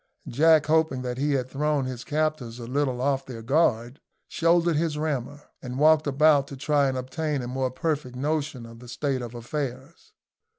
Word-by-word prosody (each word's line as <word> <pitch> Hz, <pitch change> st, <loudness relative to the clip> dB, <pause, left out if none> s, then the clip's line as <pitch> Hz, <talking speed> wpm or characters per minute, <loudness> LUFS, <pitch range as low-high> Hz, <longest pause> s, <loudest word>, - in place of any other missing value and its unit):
Jack, 155 Hz, +4 st, +4 dB
hoping 155 Hz, -4 st, +1 dB
that 125 Hz, 0 st, -4 dB
he 145 Hz, +1 st, +1 dB
had 130 Hz, -2 st, 0 dB
thrown 145 Hz, 0 st, 0 dB
his 125 Hz, -2 st, -5 dB
captors 150 Hz, -6 st, -2 dB
a 120 Hz, -, -7 dB
little 130 Hz, 0 st, -1 dB
off 135 Hz, 0 st, +1 dB
their 120 Hz, -4 st, -9 dB
guard, 125 Hz, -2 st, +1 dB, 0.3 s
shouldered 170 Hz, 0 st, +2 dB
his 155 Hz, -1 st, 0 dB
rammer, 145 Hz, -2 st, -3 dB, 0.2 s
and 125 Hz, 0 st, -6 dB
walked 155 Hz, +1 st, +4 dB
about 145 Hz, 0 st, +4 dB
to 140 Hz, -, -9 dB
try 145 Hz, 0 st, +2 dB
and 130 Hz, -, -3 dB
obtain 135 Hz, +2 st, -3 dB
a -, -, -5 dB
more 130 Hz, +1 st, -1 dB
perfect 145 Hz, -1 st, -3 dB
notion 145 Hz, -2 st, -2 dB
of 115 Hz, 0 st, -12 dB
the 125 Hz, -, -12 dB
state 130 Hz, +2 st, -2 dB
of 120 Hz, 0 st, -7 dB
affairs. 130 Hz, +4 st, -6 dB
140 Hz, 180 wpm, -26 LUFS, 125-150 Hz, 0.3 s, Jack